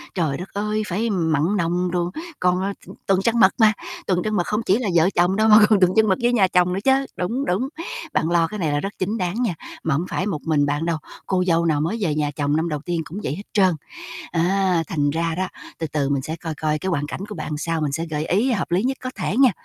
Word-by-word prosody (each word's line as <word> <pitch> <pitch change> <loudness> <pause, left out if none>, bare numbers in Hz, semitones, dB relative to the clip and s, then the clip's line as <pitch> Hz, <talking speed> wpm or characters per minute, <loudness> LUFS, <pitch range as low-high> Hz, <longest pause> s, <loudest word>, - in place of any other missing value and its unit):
trời 155 -6 0
đất 180 +3 -7
ơi, 210 +1 -1
phải 210 +6 -1
mặn 160 -7 +1
nồng 175 +1 0
đồ, 175 0 -1 0.3
còn, 180 0 +2
ờ, 200 +1 -1
t - - -12 0.2
tuần 195 -1 +3
trăng 230 +3 +1
mật 190 -2 +6
mà. 220 -1 +6 0.3
Tuần 180 -2 +2
trăng 215 0 -1
mật 175 - +2
không 210 +1 0
chỉ 195 - +3
là 240 -4 -2
vợ 165 +3 +5
chồng 175 +2 +3
đâu 215 +2 +3
mà 210 - +9
còn 210 -3 +5
tuần 185 -1 +4
trăng 220 0 +5
mật 190 - +4
với 240 +1 +2
nhà 200 -6 +4
chồng 180 -1 +2
nữa 190 - -1
chớ. 270 +1 +3
Đúng, 235 +10 -1
đúng, 215 +10 0 0.4
bạn 160 - +1
lo 170 -1 +3
cái 210 +4 -6
này 160 -5 0
là 145 - +1
rất 195 +6 -4
chính 200 +4 -1
đáng 180 -2 -2
nha, 220 -7 0 0.3
mà 160 - +1
hông 165 +5 -1
phải 185 - -1
một 170 -8 -2
mình 150 -3 +2
bạn 145 +3 -1
đâu, 170 -1 0 0.3
cô 185 -1 +1
dâu 170 -1 +3
nào 155 -3 +2
mới 170 +9 -1
về 160 -7 0
nhà 150 -1 0
chồng 145 0 0
năm 160 +2 0
đầu 150 -2 -2
tiên 175 -2 -1
cũng 185 +7 -7
vậy 135 - -2
hết 200 - -8
trơn. 190 -4 +4 0.6
Á, 180 0 +2
thành 145 -2 0
ra 165 +2 -1
đó, 185 +2 -2 0.3
từ 160 - -2
từ 145 -2 -1
mình 140 -1 0
sẽ 160 +4 -4
coi 165 -1 -5
coi 155 0 -1
cái 190 - -4
hoàn 145 -4 -1
cảnh 160 - -6
của 210 - -6
bạn 155 -2 -5
sao 165 +1 -1
mình 150 -2 -1
sẽ 165 +4 -2
gợi 150 0 -2
ý 235 +8 +2
hợp 185 -6 -2
lý 180 +3 +2
nhất 265 +2 0
có 255 - -3
thể 205 - -2
nghe. 265 -1 +6
180 Hz, 280 wpm, -22 LUFS, 160-200 Hz, 0.6 s, mà